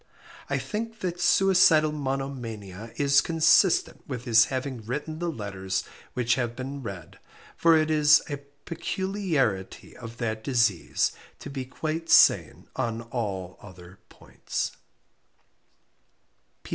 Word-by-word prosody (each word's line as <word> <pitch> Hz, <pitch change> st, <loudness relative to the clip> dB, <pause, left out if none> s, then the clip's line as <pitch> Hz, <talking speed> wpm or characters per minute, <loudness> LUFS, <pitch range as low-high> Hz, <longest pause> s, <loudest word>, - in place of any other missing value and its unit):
I -, -, 0 dB
think 225 Hz, +1 st, -5 dB
that 175 Hz, -1 st, -3 dB
suicidal 175 Hz, -5 st, +4 dB
monomania 125 Hz, -8 st, -5 dB
is 140 Hz, 0 st, +4 dB
consistent 165 Hz, +3 st, +3 dB
with 125 Hz, -4 st, -5 dB
his 115 Hz, -2 st, +6 dB
having 130 Hz, -3 st, -4 dB
written 150 Hz, +7 st, -5 dB
the 175 Hz, 0 st, -2 dB
letters 95 Hz, -, -3 dB, 0.3 s
which 120 Hz, -2 st, +2 dB
have 120 Hz, -2 st, -2 dB
been 135 Hz, +2 st, -6 dB
read, 100 Hz, -9 st, -9 dB, 0.4 s
for 165 Hz, -1 st, +5 dB
it 155 Hz, 0 st, +1 dB
is 150 Hz, 0 st, +6 dB
a 145 Hz, -2 st, -4 dB, 0.3 s
peculiarity 170 Hz, -, -2 dB
of 115 Hz, -1 st, -10 dB
that 110 Hz, -2 st, -3 dB
disease 115 Hz, -9 st, +1 dB, 0.3 s
to 140 Hz, -, -9 dB
be 135 Hz, -2 st, -5 dB
quite 160 Hz, +5 st, -4 dB
sane 160 Hz, -, +4 dB
on 115 Hz, 0 st, -2 dB
all 100 Hz, -6 st, -5 dB
other 95 Hz, -1 st, -14 dB
points. -, -, -5 dB
130 Hz, 120 wpm, -26 LUFS, 110-155 Hz, 0.4 s, his